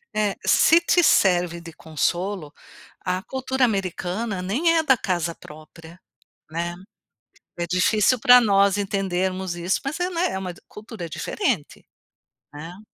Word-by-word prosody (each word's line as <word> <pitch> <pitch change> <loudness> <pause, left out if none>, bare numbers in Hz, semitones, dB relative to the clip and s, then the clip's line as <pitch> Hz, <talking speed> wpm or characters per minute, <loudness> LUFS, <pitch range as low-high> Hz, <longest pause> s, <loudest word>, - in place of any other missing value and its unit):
É. 210 -2 0
Se 330 - +5
te 345 0 +2
serve 175 - +3
de 170 -1 -11
consolo, 170 +1 -3 0.5
a 185 +1 -1
cultura 265 +1 -1
americana 195 0 -3
nem 275 - +1
é 320 - +2
da 265 -4 +4
casa 175 -5 -2
própria, 160 +3 -14 0.5
né? 170 +2 -3 0.8
É 170 - -2
difícil 205 +7 +2
pra 245 +2 +7
nós 200 -2 +3
entendermos 190 -2 -2
isso, 175 +2 -1
mas 275 +4 -3
é, 355 - 0
né, 345 0 0
é 190 - -3
uma 185 -2 -5
de - - -19
cultura 210 -5 -9
diferente. 215 - -3 0.7
Hã? 165 +6 -9
190 Hz, 140 wpm, -23 LUFS, 175-230 Hz, 0.8 s, pra